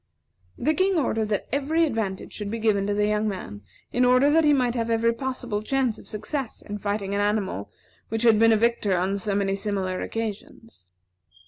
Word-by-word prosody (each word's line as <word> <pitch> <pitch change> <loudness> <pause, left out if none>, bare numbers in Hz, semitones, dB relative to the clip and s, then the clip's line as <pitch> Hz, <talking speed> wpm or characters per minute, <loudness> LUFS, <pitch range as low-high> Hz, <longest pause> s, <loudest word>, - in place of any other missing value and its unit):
The 310 - +1
King 375 +1 +2
ordered 225 -7 0
that 205 - -1
every 300 +5 +2
advantage 220 -9 -3
should 210 -1 -5
be 230 - -3
given 210 -3 +1
to 205 - 0
the 210 0 +2
young 210 +1 +1
man, 180 - -5 0.3
in 250 - +2
order 255 +3 +5
that 325 +2 +4
he 300 - +5
might 250 -4 +2
have 230 -2 -2
every 230 0 +2
possible 245 -4 -3
chance 255 0 0
of - - -14
success 230 +4 -4
in 205 0 -6
fighting 200 -1 -2
an 200 - +1
animal 205 - -1 0.4
which 225 +1 -1
had 225 -3 +5
been 225 0 +6
a 220 - +5
victor 220 -4 +1
on 190 +3 0
so 200 +1 -1
many 195 -1 +1
similar 195 -2 -2
occasions. 225 - -6
220 Hz, 200 wpm, -25 LUFS, 205-250 Hz, 0.4 s, been